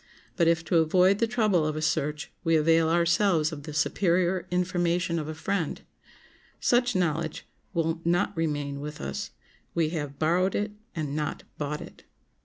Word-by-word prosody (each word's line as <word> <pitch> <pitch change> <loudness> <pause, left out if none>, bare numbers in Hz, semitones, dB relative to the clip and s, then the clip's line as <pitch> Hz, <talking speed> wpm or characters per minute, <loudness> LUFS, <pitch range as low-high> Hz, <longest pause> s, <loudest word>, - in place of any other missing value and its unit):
But 170 -3 +3
if 165 0 +2
to 175 - +2
avoid 185 +5 +4
the 230 - +2
trouble 215 -8 +2
of 155 0 -1
a 155 - -3
search 150 0 -1
we 165 -2 +3
avail 160 +1 +4
ourselves 170 -1 +3
of 150 -2 -6
the 155 - -8
superior 175 +3 +1
information 175 -1 0
of 155 - -4
a 155 - -5
friend, 165 0 -2 0.8
such 245 -1 +2
knowledge 165 -3 -1 0.3
will 165 0 0
not 175 +1 +1
remain 145 -3 -2
with 150 +1 -6
us; 70 0 -4 0.5
we 165 -2 +2
have 145 -4 -4
borrowed 180 +4 +2
it 210 +1 -1 0.2
and 150 -3 -3
not 150 -1 -3 0.2
bought 150 0 -3
it. - - -11
165 Hz, 165 wpm, -27 LUFS, 155-180 Hz, 0.8 s, avoid